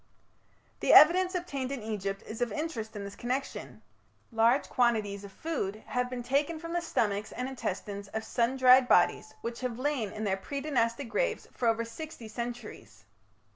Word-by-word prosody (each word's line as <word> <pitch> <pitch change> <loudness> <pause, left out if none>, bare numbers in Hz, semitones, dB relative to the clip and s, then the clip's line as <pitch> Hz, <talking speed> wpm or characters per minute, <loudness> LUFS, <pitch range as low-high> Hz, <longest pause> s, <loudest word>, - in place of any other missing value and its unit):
The - - +3
evidence 365 +4 +7
obtainable 280 -7 -3
in 240 - -8
Egypt 200 -2 -3
is 220 +2 -7
of 240 -2 0
interest 230 -6 -4
in 205 - -5
this 200 0 -7
connection. 255 +3 -4 0.5
Large 230 +4 +3
quantities 215 -5 +1
of 200 - -9
food 215 -8 -4
have 250 0 -1
been 250 -1 -5
taken 285 +6 0
from 335 +1 -6
the 345 - 0
stomachs 210 -10 -1
and 250 - -4
intestines 200 -5 -4
of 220 +2 -4
sun 240 +3 0
dried 255 0 +7
bodies - - +3
which 235 0 -5
have 250 -2 -3
lain 260 -5 -1
in 215 0 -5
their 195 -2 0
pre 280 +8 -5
Dynastic 270 -2 0
graves - - -1
for 240 - -1
over 230 0 +2
sixty 235 0 -8
centuries. 225 - -7
240 Hz, 175 wpm, -30 LUFS, 215-275 Hz, 0.5 s, evidence